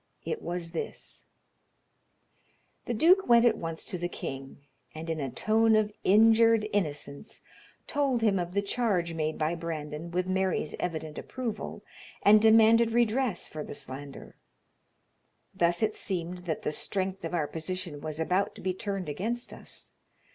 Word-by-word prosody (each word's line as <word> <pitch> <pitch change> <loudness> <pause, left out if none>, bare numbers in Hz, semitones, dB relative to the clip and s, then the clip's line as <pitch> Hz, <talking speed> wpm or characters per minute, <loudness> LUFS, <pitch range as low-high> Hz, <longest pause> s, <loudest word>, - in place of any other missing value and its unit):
It 460 - -3
was 170 -1 -4
this: 165 - -6 1.6
the 240 - -2
duke 360 - +5
went 235 0 +7
at 235 - +5
once 165 -1 -4
to 180 - -4
the 175 +1 -2
king, 135 -5 -6 0.4
and, 165 +1 -4
in 160 - -2
a 135 -2 -2
tone 220 - +3
of 215 -1 +2
injured 225 +1 +5
innocence, 145 -3 -2 0.4
told 275 -5 0
him 200 -4 +3
of 175 +1 -4
the 200 - +2
charge 200 -6 0
made 155 -1 -2
by 155 +1 0
Brandon 160 -1 -5
with 180 +1 -1
Mary's 185 -4 0
evident 160 -3 -3
approval, 235 -5 -5 0.4
and 210 +1 +7
demanded 225 +1 +6
redress 235 -2 +1
for 155 -1 -6
the - - -7
slander. 140 +1 -8 1.2
Thus 175 +4 +2
it 215 0 +2
seemed 180 -2 -4
that 160 -3 -3
the - - 0
strength 190 +3 -1
of 165 +1 -3
our 160 -3 +1
position 165 -1 -5
was 155 0 -5
about 180 +4 0
to - - -10
be 185 - -1
turned 195 -1 -4
against 220 +11 -3
us. - - -8
185 Hz, 155 wpm, -29 LUFS, 160-220 Hz, 1.6 s, went